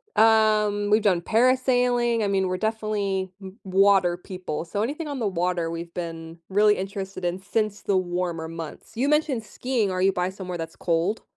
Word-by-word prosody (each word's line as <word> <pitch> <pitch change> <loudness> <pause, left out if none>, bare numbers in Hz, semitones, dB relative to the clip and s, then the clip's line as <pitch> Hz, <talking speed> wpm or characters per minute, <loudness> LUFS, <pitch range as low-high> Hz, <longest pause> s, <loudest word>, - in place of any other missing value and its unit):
Um, 215 -2 +4
we've 215 +1 +4
done 185 -5 +2
parasailing. 245 0 +2
I - - +1
mean, 190 -1 +1
we're 185 0 -1
definitely 210 -3 -1
w 190 +1 -10
water 190 -2 +3
people, 180 -3 -5
so 200 +5 -3
anything 295 +7 -3
on 280 -3 -4
the 220 - 0
water, 175 -2 -1
we've 170 0 -6
been 165 -1 -6
really 210 +2 +4
interested 190 -1 -5
in 175 +1 -1
since 210 0 -1
the 195 -2 +1
warmer 175 -2 -2
months. 165 +5 -8
You 260 +4 0
mentioned 300 -6 +1
skiing. 225 -2 -1
Are 185 0 -1
you 195 +1 +4
by 180 0 -1
somewhere 185 -2 -6
that's 165 0 -6
cold? 170 +5 0
195 Hz, 180 wpm, -25 LUFS, 180-220 Hz, -, Um